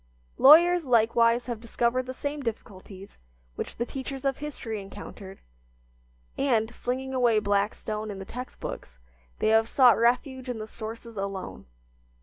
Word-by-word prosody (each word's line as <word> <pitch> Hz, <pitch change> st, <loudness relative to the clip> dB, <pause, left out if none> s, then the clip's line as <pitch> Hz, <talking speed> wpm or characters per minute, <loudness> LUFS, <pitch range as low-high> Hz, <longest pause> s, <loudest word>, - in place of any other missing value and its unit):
Lawyers 345 Hz, +5 st, +7 dB
likewise 235 Hz, -1 st, +3 dB
have 240 Hz, -2 st, -4 dB
discovered 235 Hz, +2 st, -1 dB
the -, -, -3 dB
same 290 Hz, +2 st, -4 dB
difficulties 200 Hz, -4 st, -8 dB, 0.3 s
which -, -, -6 dB
the 235 Hz, -, -2 dB
teachers 270 Hz, +1 st, -6 dB
of 270 Hz, -1 st, +1 dB
history 250 Hz, -8 st, -5 dB
encountered, 195 Hz, 0 st, -10 dB, 1.0 s
and, 235 Hz, -5 st, +1 dB
flinging 260 Hz, +2 st, -4 dB
away 240 Hz, -4 st, +3 dB
Blackstone 210 Hz, +1 st, -1 dB
and 200 Hz, -2 st, -6 dB
the 195 Hz, -, -7 dB
text 250 Hz, +5 st, -8 dB
books, -, -, -7 dB, 0.4 s
they -, -, +1 dB
have 225 Hz, +1 st, +3 dB
sought 250 Hz, -4 st, +5 dB
refuge 255 Hz, +2 st, +1 dB
in 245 Hz, -, -3 dB
the 215 Hz, -, -5 dB
sources 225 Hz, +1 st, -9 dB
alone. 195 Hz, -, -5 dB
235 Hz, 140 wpm, -27 LUFS, 215-260 Hz, 1.0 s, Lawyers